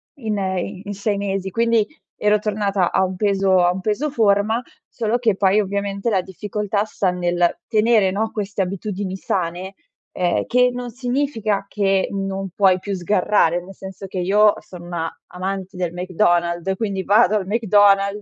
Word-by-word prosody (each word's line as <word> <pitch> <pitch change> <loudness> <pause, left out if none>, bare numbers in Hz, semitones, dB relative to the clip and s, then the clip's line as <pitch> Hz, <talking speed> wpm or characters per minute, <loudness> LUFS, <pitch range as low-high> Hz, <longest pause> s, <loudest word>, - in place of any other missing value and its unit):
in 220 -6 -3
i 190 0 -3
in 205 - -4
6 205 +1 -1
mesi, 195 -1 -3
quindi, 230 -1 +2 0.4
ero 210 0 +4
tornata 200 -3 0
a 190 - +2
un 185 0 -2
peso 195 -2 +2
a 175 - +4
un 185 +1 -4
peso 230 +9 -1
forma, 220 -1 +2 0.3
solo 230 0 -1
che 225 -5 +1
poi, 195 +2 +3
ovviamente, 200 +2 -2
la 190 -2 +2
difficoltà 205 +2 -3
sta 195 -3 -1
nel 175 -1 0
tenere, 215 -3 +3
no, 215 +3 -1
queste 200 -2 -3
abitudini 190 0 -3
sane, 185 0 -3 0.4
uhm, 180 -1 0
che 250 0 +3
non 245 -1 -6
significa 245 -5 -1
che 195 -2 +1
non 195 -1 -3
puoi 190 -2 +4
più 195 +2 -5
sgarrare, 180 -1 +1
nel 195 +2 -11
senso, 190 +1 -9
che 190 -1 -5
io 205 +3 +4
sono 175 -2 -12
una 165 -2 -4
amante 190 +1 -4
del 175 -2 -2
McDonald's, 175 0 0
quindi, 195 -2 -2
vado 210 +1 +4
al 190 -2 -4
McDonald's, 205 -2 +3
195 Hz, 165 wpm, -21 LUFS, 185-210 Hz, 0.4 s, ero